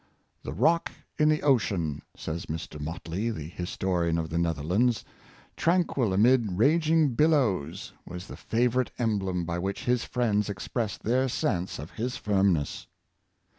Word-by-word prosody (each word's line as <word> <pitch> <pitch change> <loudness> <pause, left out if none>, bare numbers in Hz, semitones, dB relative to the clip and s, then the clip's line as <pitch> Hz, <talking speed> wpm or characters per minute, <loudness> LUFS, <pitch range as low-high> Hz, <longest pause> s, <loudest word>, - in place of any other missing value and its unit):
^' - - -37 0.4
The - - -6
rock 155 - +2 0.3
in 150 0 +5
the 155 0 +1
ocean," 95 - +1 0.2
says 80 +1 -5
Mr. 80 -1 -5
Motley, 85 +7 -3
the 80 -10 -4
historian 90 -1 -1
of 80 -1 -3
the 85 - 0
Netherlands, 85 - +1 0.3
" - - -27
tran 175 +1 +3
quil 120 -10 0
amid 110 +1 +4
raging 155 - +3
billows, 125 - +1
was 90 +1 -8
the - - -9
favorite 125 +2 +1
emblem 95 -7 0
by 85 +1 -2
which 95 +2 -3
his 125 -1 +2
friends 105 -4 0
expressed 105 +2 -3
their 130 +4 +2
sense 90 -6 -1
of 75 +4 -8
his 125 +3 -3
firmness." 95 -8 +1
105 Hz, 150 wpm, -28 LUFS, 85-125 Hz, 0.4 s, in